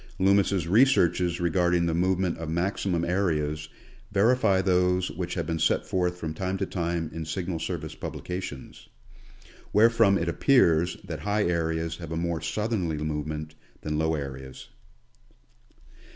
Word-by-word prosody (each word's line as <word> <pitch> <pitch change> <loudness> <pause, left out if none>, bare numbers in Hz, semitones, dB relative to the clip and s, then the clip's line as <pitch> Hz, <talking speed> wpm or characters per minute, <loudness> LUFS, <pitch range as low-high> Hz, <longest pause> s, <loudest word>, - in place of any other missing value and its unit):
Loomis' 100 -2 +3
researches 90 -5 +3
re 85 -1 0
garding 90 0 +2
the 85 - 0
movement 90 +1 +1
of 80 -1 -5
maximum 85 0 -1
areas 75 -5 -1 0.4
verify 105 -1 +3
those 90 -1 +2
which 90 -1 -4
have 85 -4 -2
been 80 +1 -2
set 80 - +2
forth 90 -1 -1
from 80 -3 -4
time 95 +3 -2
to 95 - -1
time 85 -3 -2
in 80 0 -4
Signal 85 +2 -3
Service 80 -2 -4
publica 90 +1 -5
tions; 70 -7 -9 0.8
wherefrom 115 -2 +5
it 85 - -2
appears 85 - +3
that 85 -5 -6
high 105 +6 0
areas 80 -1 -1
have 85 -2 -8
a 80 - -2
more 85 -1 -2
south 105 +7 -2
erly 85 -8 -1
movement 75 0 -4 0.3
than 75 0 -2
low 80 0 +1
areas. 65 -2 -7
85 Hz, 150 wpm, -27 LUFS, 80-95 Hz, 0.8 s, wherefrom